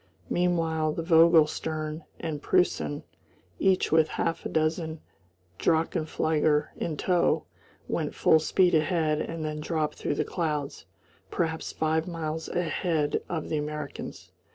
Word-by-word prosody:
Meanwhile 165 -3 +1
the 165 - -3
Vogel 165 -1 +6
stern 155 0 -4
and 155 -3 -4
Preussen, 180 -5 +1 0.6
each 190 -1 +2
with 160 0 +5
half 165 0 -1
a - - -8
dozen 160 0 -1 0.6
drachenflieger 155 -2 +1
in 155 -3 -3
tow, 180 +1 +2 0.4
went - - -2
full 160 - +5
speed 180 +3 +3
ahead 155 -1 +2
and 165 -1 -4
then 150 0 -3
dropped 155 -1 -2
through 145 - -1
the - - 0
clouds, 150 -5 -3 0.4
perhaps 160 -1 -2
five 160 +1 0
miles 160 -2 -4
ahead 165 -3 0
of 160 -3 -3
the 155 - 0
Americans. 150 -1 -6
160 Hz, 130 wpm, -27 LUFS, 155-165 Hz, 0.6 s, Vogel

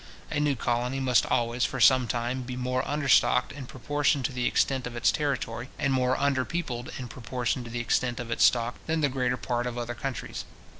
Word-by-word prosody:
A 150 - 0
new 150 -1 +2
colony 120 +3 -1
must 130 -2 +3
always, 120 0 0
for 135 - -1
some 125 +1 +6
time, 120 +3 -2
be 125 0 -6
more 125 0 -1
understocked 140 -2 +3
in 140 -2 -8
proportion 145 +2 0
to - - -1
the 125 -1 -1
extent 130 -2 +1
of 120 - -8
its 120 - +3
territory, 135 -4 -2
and 135 -2 +1
more 130 0 +2
underpeopled 135 -1 -1
in 125 - -6
proportion 120 +1 -3
to - - -8
the 120 +1 -3
extent 120 +1 0
of 120 -1 -5
its - - +2
stock, 120 0 +3
than 160 0 0
the 145 - +3
greater 125 -1 0
part 120 -1 -2
of 120 0 -5
other 120 0 -3
countries. 120 -1 -5
125 Hz, 205 wpm, -27 LUFS, 120-135 Hz, -, some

